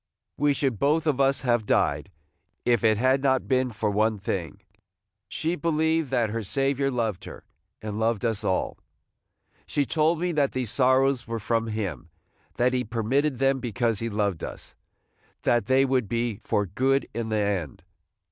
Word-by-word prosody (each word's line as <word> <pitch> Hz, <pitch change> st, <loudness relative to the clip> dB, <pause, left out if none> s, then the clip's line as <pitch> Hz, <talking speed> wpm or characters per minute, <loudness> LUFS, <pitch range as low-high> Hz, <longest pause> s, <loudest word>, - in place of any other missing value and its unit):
We 145 Hz, 0 st, +2 dB
should 135 Hz, -6 st, -1 dB
both 150 Hz, +5 st, +2 dB
of 140 Hz, -3 st, +1 dB
us 135 Hz, 0 st, +2 dB
have 120 Hz, -4 st, +1 dB
died, 75 Hz, +1 st, +1 dB, 0.6 s
if 120 Hz, -3 st, +2 dB
it 110 Hz, -1 st, +4 dB
had 130 Hz, +4 st, +2 dB
not 130 Hz, -2 st, +1 dB
been 130 Hz, -1 st, +2 dB
for 110 Hz, -2 st, -2 dB
one 110 Hz, +1 st, +1 dB
thing: 95 Hz, -4 st, -4 dB, 0.7 s
she 160 Hz, -, -1 dB
believed 160 Hz, -1 st, 0 dB
that 120 Hz, -5 st, +1 dB
her 115 Hz, +1 st, -2 dB
Saviour 135 Hz, +5 st, 0 dB
loved 110 Hz, -8 st, -2 dB
her, -, -, -10 dB, 0.4 s
and 105 Hz, 0 st, -4 dB
loved 115 Hz, 0 st, 0 dB
us 110 Hz, -3 st, -1 dB
all. 95 Hz, -, -1 dB, 0.9 s
She 145 Hz, -, 0 dB
told 160 Hz, +2 st, +1 dB
me 180 Hz, +1 st, 0 dB
that 145 Hz, -4 st, +1 dB
these 125 Hz, -4 st, -2 dB
sorrows 130 Hz, -1 st, +2 dB
were 115 Hz, 0 st, -3 dB
from 115 Hz, +1 st, -1 dB
him, 95 Hz, -, -4 dB, 0.2 s
– -, -, -38 dB
that 125 Hz, +1 st, +2 dB
he 125 Hz, -1 st, +1 dB
permitted 125 Hz, +5 st, 0 dB
them 135 Hz, +1 st, +2 dB
because 120 Hz, -3 st, -1 dB
he 115 Hz, -, -2 dB
loved 100 Hz, -5 st, -1 dB
us, -, -, -7 dB, 0.3 s
– -, -, -39 dB
that 120 Hz, -1 st, +2 dB
they 130 Hz, +1 st, +4 dB
would 130 Hz, -4 st, +1 dB
be 115 Hz, -2 st, -1 dB
for 105 Hz, -, 0 dB
good 130 Hz, +9 st, +1 dB
in 115 Hz, 0 st, -3 dB
the 110 Hz, -, 0 dB
end. 100 Hz, -9 st, -2 dB
120 Hz, 175 wpm, -26 LUFS, 110-135 Hz, 0.9 s, it